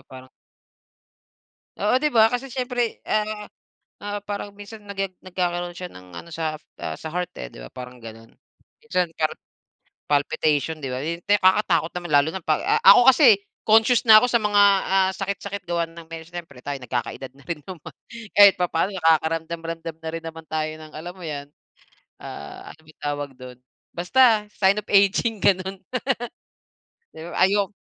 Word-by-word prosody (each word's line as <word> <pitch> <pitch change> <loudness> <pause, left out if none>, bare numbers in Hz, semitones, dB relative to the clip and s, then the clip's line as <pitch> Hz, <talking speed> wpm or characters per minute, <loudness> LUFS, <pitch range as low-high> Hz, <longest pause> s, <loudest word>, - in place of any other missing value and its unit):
parang 130 0 -12 1.5
Oo 215 +6 +1
di 300 - +2
ba? 225 -3 +4
Kasi 255 +2 -3
siyempre, 245 -2 -3
ah, 215 0 -1 0.5
ah, 205 0 -5
parang 205 0 -6
minsan 205 +2 -11
nage 195 -1 -3 0.2
nagkakaroon 175 -1 -2
siya 180 0 -7
ng 90 -1 -14
ano 170 - -9
sa 160 -1 -3 0.2
sa 160 - -6
heart, 180 +1 -4
eh, 60 - -7
di - - -14
ba - - -9
parang 125 - -10
ganon? 115 0 -12 0.5
Minsan 180 - -1
parang 155 -1 0 0.7
palpitation 150 +2 0
di 135 -4 -5
ba 130 - -3
yun, 165 +3 -3
kakatakot 185 -4 +3
naman 175 -2 -6
lalo 145 +2 +5
na 185 0 -7
pag 155 -1 +1
a - - +2 0.2
ako 245 +4 +7
kasi 240 -7 +6 0.2
conscious 225 +3 +4
na 215 -1 +9
ako 250 - +1
sa 235 - +4
mga, 210 -2 +2 0.2
ah, 190 0 +3
sakit-sakit 200 0 -4
gawa 170 -1 -1
ng 165 0 -12 0.2
siyempre 165 -6 -10
tayo 140 +1 -4
nagkaka-edad 125 +1 -5
na 140 - -19
rin 165 -2 -5
naman 180 -5 -10 0.4
kahit 200 -1 +9
papaano 180 +1 -1
nakakaramdam-ramdam 165 -1 -1
na 160 0 -6
rin 165 - -4
naman 160 0 -8
tayo 155 0 -2
ng 155 -1 -12
alam 175 +3 -7
mo 180 - -9
yan, 145 -2 -6 0.7
ah, 75 0 -9
ano - - -23
bang 155 0 -20
tawag 145 -1 -3
dun? 125 -1 -11 0.4
Basta, 220 +4 +3
sign 195 +1 +3
of 210 - -27
aging 200 +3 +3
ganun. 190 0 +1 1.3
Di - - -10
ba 175 - -8
ay 190 - +5
yu 205 -1 +2
175 Hz, 165 wpm, -23 LUFS, 155-205 Hz, 1.5 s, na